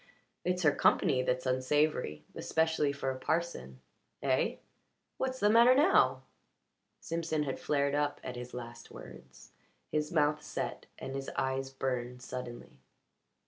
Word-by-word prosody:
It's 180 0 0
her 150 - +6
company 130 -2 +3
that's 130 0 -1
unsavoury. 130 - +1
Especially 160 -2 +1
for 140 -1 -2
a 130 - -6
parson. 130 - -2 0.4
Eh? - - +2 0.6
What's 260 0 -2
the 205 - +4
matter 235 +4 +7
now?" 305 +8 +4 0.8
Simpson 165 -2 -1
had 135 -2 -3
flared 140 -1 +1
up 145 0 0
at 125 -1 -5
his 125 0 -7
last 120 -1 -8
words. - - -13 0.4
His 150 0 -1
mouth 150 -2 +2
set - - -5
and 135 - -6
his 135 0 -4
eyes 135 0 -1
burned 125 -2 -3
suddenly. 125 -2 -7
140 Hz, 135 wpm, -32 LUFS, 125-160 Hz, 0.8 s, matter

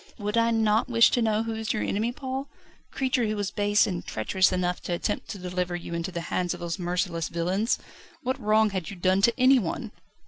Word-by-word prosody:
"Would 210 -1 -3
I 230 0 +3
not 220 0 +2
wish 230 -1 +5
to 245 - +2
know 220 -1 +1
who 225 0 -3
is 220 +1 -2
your 215 - -1
enemy, 220 +4 0
Paul 265 +1 -5 0.4
the - - -25
creature 260 -3 +1
who 215 - -1
was 205 -2 -2
base 205 0 +3
and 180 -4 -3
treacherous 185 - +1
enough 180 0 -1
to 175 - -3
attempt 190 +4 -2
to 205 - -5
deliver 180 -1 -3
you 170 -1 -6
into 170 +2 -3
the 170 -1 -4
hands 180 -1 0
of - - -11
those 170 +1 -4
merciless 175 -1 -1
villains? 185 +7 0 0.5
What 260 +2 -1
wrong 215 -1 +3
had 185 -4 -3
you 200 - -7
done 185 +2 +2
to 235 +5 +3
anyone?" 255 -8 +3
205 Hz, 220 wpm, -26 LUFS, 180-230 Hz, 0.5 s, wish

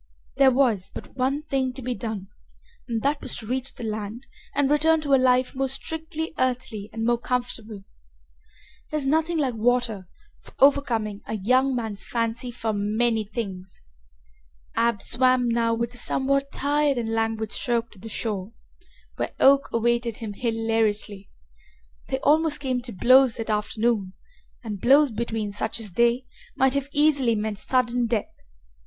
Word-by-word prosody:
There 270 -1 +7
was 245 -8 +2
but - - -10
one 270 +3 0
thing 265 -4 -1
to 265 - -8
be 250 +1 -1
done 220 -5 -5 0.6
and 230 -3 -2
that 285 +1 +1
was 260 - -4
to 220 - -7
reach 260 +3 -3
the - - -8
land 220 +3 -5 0.3
and 285 -1 +3
return 315 +3 +3
to 285 -2 0
a - - +8
life 255 0 +3
more 270 0 -1
strictly 320 +3 -4
earthly 250 -5 -2
and 225 0 -3
more 240 0 +2
comfortable. 235 -5 -3 1.1
There 305 - -1
is 290 - -2
nothing 320 +4 +1
like 270 -5 +1
water 230 -4 0 0.3
for - - -17
overcoming 235 -7 +2
a - - -2
young 255 +6 +2
man's 220 -4 -3
fancy 235 +1 -2
for 230 -2 -3
many 220 +2 +1
things. 195 -4 -6 1.0
Ab 230 -3 +1
swam 255 0 +3
now 230 -1 +1
with 235 +1 -3
a - - -8
somewhat 275 +2 0
tired 290 -1 +1
and 225 -2 -2
languid 225 -1 -1
stroke 235 -1 -1
to 200 - -16
the 225 +4 -9
shore, 210 -1 -3 0.6
where - - -3
Oak 275 +1 +5
awaited 235 0 0
him 220 -3 -6
hilariously. 225 -3 -1 0.8
They 265 - -1
almost 310 0 +3
came 260 -3 -1
to 240 0 -8
blows 255 +4 +5
that 225 -2 -3
afternoon, 210 -2 0 0.5
and 210 -4 -5
blows 275 +2 +5
between 220 -2 -3
such 205 +3 -3
as 215 -4 -6
they 235 +5 +2 0.3
might 265 0 +3
have 280 0 -1
easily 285 -6 +3
meant 210 -1 -3
sudden 245 -1 +1
death. 225 -2 -2
240 Hz, 160 wpm, -25 LUFS, 220-265 Hz, 1.1 s, a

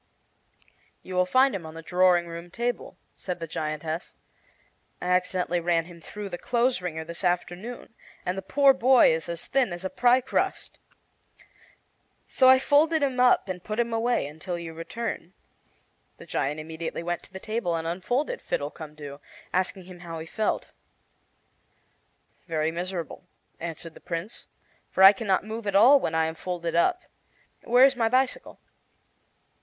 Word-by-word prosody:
"You 185 - -8
will 180 0 +2
find 260 +6 +4
him 190 -3 -4
on 160 0 -9
the 165 - -9
drawing 180 0 +3
room 170 +1 -8
table," 240 +5 -3 0.2
said 180 -2 -5
the 165 - -4
giantess. 155 +1 -4 0.8
"I - - -6
accidently 180 -1 +1
ran 170 -1 +1
him 170 -1 -13
through 205 +4 -7
the 175 - -6
clothes 245 -2 +1
wringer 160 -3 -4
this 170 +3 -7
afternoon, 180 +7 -2 0.3
and 180 - -1
the 195 - -4
poor 275 +8 +4
boy 260 -6 +5
is 160 +1 -3
as 170 -1 -5
thin 265 -7 +1
as 175 +2 -6
a 190 - -3
pie 250 +1 +4
crust. 255 - -2 1.5
So 260 - +4
I 260 - +8
folded 300 +4 +3
him 260 -3 0
up 250 -4 +4
and 180 -1 -5
put 215 +1 -4
him 235 -1 0
away 230 -5 +1
until 160 +5 -5
you 165 -1 -7
returned." 170 +2 -5 0.8
The - - -12
giant 145 +3 -2
immediately 160 +1 -5
went 175 0 -2
to - - -19
the 190 - -8
table 215 -5 -2
and 165 0 -3
unfolded 245 - -2
Fiddlecumdoo, 150 - -5 0.3
asking 185 +1 -1
him 180 0 -12
how 170 -1 -7
he 160 - -6
felt. 215 +6 -2 1.8
"Very 160 -1 0
miserable," 175 -1 -5 0.3
answered 165 0 -7
the - - -14
Prince, 170 +6 -6 0.4
"for 190 - +2
I 195 +1 +11
can 220 +2 -6
not 190 -1 +2
move 220 0 -6
at 200 - -1
all 260 +8 +8
when 160 - -2
I 160 0 +3
am 160 - -2
folded 170 0 -4
up. 355 - +2 0.6
Where 245 +2 +6
is 270 0 +3
my 230 -2 +1
bicycle?" 255 +2 0
180 Hz, 165 wpm, -26 LUFS, 165-235 Hz, 1.8 s, I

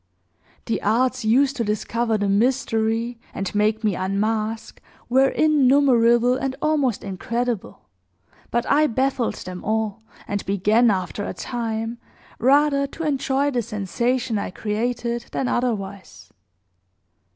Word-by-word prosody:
"The 230 - -1
arts 250 +4 +1
used 265 +6 +3
to 235 - 0
discover 225 +2 -1
the 205 -1 -1
mystery 225 +1 0 0.2
and 195 - -3
make 215 +2 +1
me 210 -2 +2
unmask 215 +4 -2 0.3
were 265 +2 +5
innumerable 255 -5 +4
and 265 0 -2
almost 290 -7 0
incredible; 230 +3 -3 0.7
but 240 0 0
I 300 +2 +4
baffled 260 0 0
them 180 0 -8
all, 220 0 -1 0.3
and 205 -1 -2
began, 210 +5 +3
after 190 0 -2
a - - -5
time, 230 -1 -4 0.4
rather 280 +2 +3
to 325 - -7
enjoy 280 -1 0
the 245 -3 0
sensation 230 +2 -1
I - - -3
created 235 +4 -2
than 265 - -1
otherwise. 200 - -3
235 Hz, 120 wpm, -22 LUFS, 210-255 Hz, 0.7 s, were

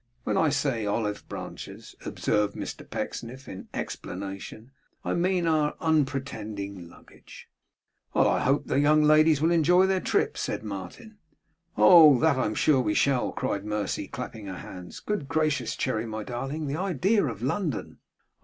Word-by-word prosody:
When - - -1
I 160 - +3
say 135 -5 0
olive 105 0 -2
branches,' - - -8
observed 105 -1 0
Mr - - -7
Pecksniff, 130 +4 -5
in 95 - -9
explanation, 100 +5 -6 0.3
'I - - 0
mean, 180 0 +1
our 155 -2 +1
unpretending 110 - -2
luggage.' - - -15 0.7
'I - - +3
hope 135 +3 +1
the - - +1
young 150 +1 +4
ladies 155 0 +5
will 165 - +3
enjoy 175 +3 +4
their 190 0 +1
trip,' - - 0
said - - -3
Martin. 105 - -8 0.6
'Oh! 160 -6 +8
that 160 0 +3
I'm 110 -5 -1
sure 145 -4 +3
we 105 -4 0
shall!' 135 -3 +2
cried 100 -6 -2
Mercy, 105 -2 -2
clapping 110 -3 -7
her 95 -2 -6
hands. 90 -1 -9
'Good 210 -9 -3
gracious, 145 -7 0
Cherry, 110 +1 -1
my 110 -1 -5
darling, 135 +7 -4
the 140 +2 -2
idea 190 - +1
of 115 -3 -6
London! 150 - -2
135 Hz, 150 wpm, -27 LUFS, 105-155 Hz, 0.7 s, Oh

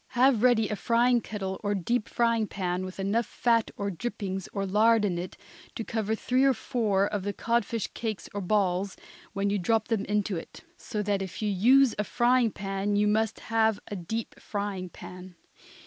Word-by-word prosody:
Have 250 -2 +4
ready 235 -3 +4
a 210 - -2
frying 240 +3 +3
kettle 190 -3 -5
or 205 0 0
deep 215 +5 -1
frying 230 -2 +1
pan 185 -1 -2
with 185 +1 -8
enough 205 +4 0
fat 230 -2 +1
or 200 0 -2
drippings, 195 -1 -4
or 195 0 -2
lard, 215 +3 +4
in 175 -4 -1
it 180 - -6 0.4
to 230 - -3
cover 220 -1 -1
three 255 +4 +1
or 270 -1 +4
four 215 -5 +1
of 205 -1 -2
the 200 +1 -3
codfish 230 -1 0
cakes 220 -3 -4
or 205 - -3
balls, 195 - 0 0.4
when 200 0 0
you 205 - +1
drop 220 +4 +1
them 220 -4 +1
into 205 -2 0
it. 165 - -10
So 210 -10 -4
that 200 -1 0
if 190 +3 -5
you 210 - +1
use 245 +6 +5
a - - +2
frying 245 +2 +3
pan 195 0 -2
you 210 +1 +3
must 220 +1 +1
have 220 -1 +1
a 205 - -4
deep 215 +5 -5
frying 200 -3 -4
pan. 180 +1 -11
210 Hz, 190 wpm, -28 LUFS, 195-230 Hz, 0.4 s, use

